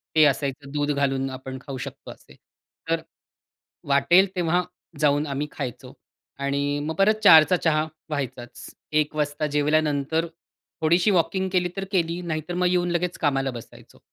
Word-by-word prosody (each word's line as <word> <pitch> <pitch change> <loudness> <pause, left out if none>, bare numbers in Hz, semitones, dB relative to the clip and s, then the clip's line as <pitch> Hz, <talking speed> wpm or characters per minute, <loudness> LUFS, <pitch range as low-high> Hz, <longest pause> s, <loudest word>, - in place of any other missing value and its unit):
ते 155 - +6
असायचं 140 0 -1
दूध 145 0 0
घालून 135 -1 0
आपण 130 0 -7
खाऊ 135 -2 -7
शकतो - - -8
असे. - - -17 0.5
तर - - +1 0.9
वाटेल 140 +8 +4
तेव्हा 175 0 +1 0.4
जाऊन 145 0 +2
आम्ही 140 +2 -3
खायचो 130 -5 -7 0.5
आणि 140 +1 -1
मग 160 - -3
परत 200 +4 +4
04:00 160 -1 +9
चा 180 - +4
चहा 155 -2 +1 0.3
व्हायचाच. 125 -4 -5 0.3
01:00 155 0 +1
वाजता 150 0 -1
जेवल्यानंतर 150 +1 +1 0.6
थोडीशी 170 +6 +3
वॉकिंग 185 +2 +1
केली 180 -1 +2
तर 195 - -2
केली 170 -2 0
नाहीतर 160 0 -4
मग 180 0 +1
येऊन 175 -1 +1
लगेच 175 +1 -1
कामाला 135 -3 +1
बसायचो 120 -2 -12
150 Hz, 150 wpm, -24 LUFS, 140-175 Hz, 0.9 s, 04:00